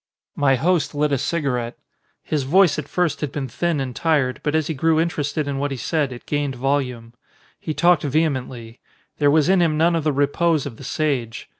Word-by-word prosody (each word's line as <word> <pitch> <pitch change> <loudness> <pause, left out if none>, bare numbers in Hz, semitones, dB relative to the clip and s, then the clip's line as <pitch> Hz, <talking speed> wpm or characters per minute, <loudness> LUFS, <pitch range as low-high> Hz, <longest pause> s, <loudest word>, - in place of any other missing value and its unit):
My 135 -2 +3
host 165 +3 0
lit 150 0 +1
a 140 - +2
cigarette. 125 -7 -2 0.5
His 150 -2 -1
voice 170 +5 +3
at 145 - -6
first 180 -2 -1
had 150 -3 -2
been 140 -2 -4
thin 170 +4 -1
and 130 -3 -4
tired, 145 -6 +1
but 150 0 -1
as 160 -1 +1
he 160 - -2
grew 160 +3 +2
interested 150 -3 -1
in 140 -1 -2
what 145 +1 -1
he 135 - -4
said 150 +1 -1
it 120 - -10
gained 145 -2 -2
volume. 125 -3 -2 0.5
He 155 - -4
talked 175 -1 +4
ve 150 +2 +1
hemently. 125 -6 -4 0.4
There 145 -1 +4
was 150 +1 +3
in 190 -1 +4
him 160 -3 +2
none 170 +2 +3
of 165 - -1
the 155 - +2
repose 145 +2 +1
of 125 -6 -7
the - - -11
sage. 135 -5 -2
145 Hz, 210 wpm, -21 LUFS, 135-160 Hz, 0.5 s, talked